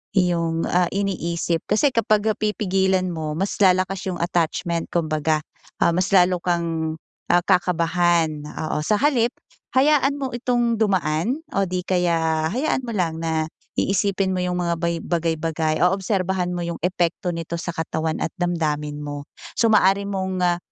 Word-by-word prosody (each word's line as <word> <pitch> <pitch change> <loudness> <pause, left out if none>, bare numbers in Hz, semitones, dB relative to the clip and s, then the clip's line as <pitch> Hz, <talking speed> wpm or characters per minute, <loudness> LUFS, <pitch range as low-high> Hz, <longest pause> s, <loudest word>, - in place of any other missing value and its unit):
yung, 170 -3 +1
ah, 180 -1 +2
iniisip. 170 -4 -1
Kasi 250 +6 +3
kapag 215 -2 +2 0.2
pipigilan 190 -3 +1
mo 155 -2 -4
mas 195 +3 -1
lalakas 185 0 +2
yung 180 - -3
attachment 170 0 -1
kumbaga, 155 -2 +1 0.4
ah, 170 - +3
mas 185 +2 +1
lalo 180 -2 +4
kang, 165 -2 -1 0.3
ah 175 0 +3
kakabahan, 170 -3 +2
oo. 150 0 -3
Sa 210 +8 +1
halip 245 -3 +2 0.5
hayaan 280 0 +4
mo 270 -3 -4
itong 240 -2 0
dumaan 195 - 0
o 195 - +1
di 180 0 -2
kaya 165 -3 +1
hayaan 260 - 0
mo 250 - -7
lang 170 -7 -1
na 160 -1 0 0.3
iisipin 195 -1 +1
mo 185 - -1
yung 180 0 -1
mga 170 -2 -1
bay 170 0 0
bagay-bagay 160 -2 -1
o 180 - +4
obserbahan 190 -2 -1
mo 175 - -3
yung 170 0 -5
epekto 180 0 0
nito 165 -1 -4
sa - - -5
katawan 160 -1 -2
at - - -3
damdamin 155 -5 -1
mo. 145 0 -6 0.2
So, 230 - +2
maaari 200 -1 +3
mong, 190 -2 -2
ah, 175 -1 +2
175 Hz, 155 wpm, -22 LUFS, 165-195 Hz, 0.5 s, lalo